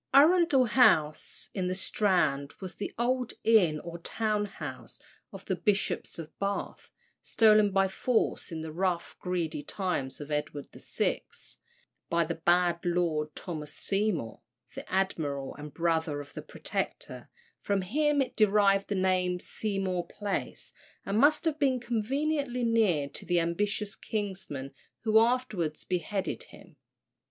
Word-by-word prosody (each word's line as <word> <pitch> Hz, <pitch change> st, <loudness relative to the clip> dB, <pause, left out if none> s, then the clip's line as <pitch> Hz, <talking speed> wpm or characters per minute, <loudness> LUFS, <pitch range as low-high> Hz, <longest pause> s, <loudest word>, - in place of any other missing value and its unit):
Arundel 305 Hz, -2 st, +6 dB
House, 160 Hz, -, +2 dB
in 185 Hz, -2 st, -1 dB
the 185 Hz, -, -1 dB
Strand, 180 Hz, -8 st, +1 dB
was 185 Hz, -2 st, -6 dB
the 205 Hz, -, -5 dB
old 250 Hz, +1 st, 0 dB
inn 185 Hz, -9 st, +4 dB
or 170 Hz, 0 st, -7 dB
town 210 Hz, +3 st, -1 dB
house 200 Hz, -, -8 dB, 0.3 s
of -, -, -10 dB
the -, -, 0 dB
Bishops 205 Hz, -3 st, 0 dB
of 165 Hz, -2 st, -8 dB
Bath, 200 Hz, 0 st, -3 dB, 0.3 s
stolen 215 Hz, -2 st, +5 dB
by 195 Hz, 0 st, +3 dB
force 220 Hz, +1 st, 0 dB
in 160 Hz, -1 st, -4 dB
the 160 Hz, 0 st, -6 dB
rough, 175 Hz, +1 st, -1 dB
greedy 170 Hz, -4 st, -2 dB
times 160 Hz, -6 st, -3 dB
of 145 Hz, 0 st, -8 dB
Edward 150 Hz, -1 st, -3 dB
VI., -, -, -1 dB, 0.9 s
by 170 Hz, 0 st, +2 dB
the 170 Hz, -, -2 dB
bad 175 Hz, +1 st, +2 dB
Lord 165 Hz, -4 st, 0 dB
Thomas 155 Hz, -5 st, -6 dB
Seymour, 195 Hz, -, -1 dB, 0.3 s
the -, -, -9 dB
admiral, 150 Hz, -8 st, -1 dB
and 150 Hz, +1 st, -8 dB
the 145 Hz, -, -14 dB
brother 160 Hz, -3 st, 0 dB
of 145 Hz, -1 st, -10 dB
the -, -, -6 dB
Protector; -, -, -5 dB, 0.3 s
from 200 Hz, -2 st, 0 dB
him 290 Hz, +7 st, +2 dB
it -, -, -9 dB
derived 200 Hz, -2 st, +4 dB
the 205 Hz, -, -1 dB
name 185 Hz, -1 st, +2 dB
of 180 Hz, -, -7 dB
Seymour 195 Hz, -4 st, -2 dB
Place, 205 Hz, 0 st, -4 dB, 0.3 s
and 200 Hz, +2 st, 0 dB
must 300 Hz, +5 st, +4 dB
have 310 Hz, -2 st, 0 dB
been 265 Hz, -3 st, +2 dB
conveniently 250 Hz, +3 st, -1 dB
near 215 Hz, -11 st, +2 dB
to -, -, -9 dB
the 175 Hz, 0 st, +2 dB
ambitious 200 Hz, +4 st, -1 dB
kinsman 190 Hz, -10 st, -4 dB, 0.3 s
who 220 Hz, 0 st, +5 dB
afterwards 225 Hz, -10 st, 0 dB
beheaded 185 Hz, +2 st, -2 dB
him. 180 Hz, -5 st, -16 dB
190 Hz, 145 wpm, -29 LUFS, 165-220 Hz, 0.9 s, Arundel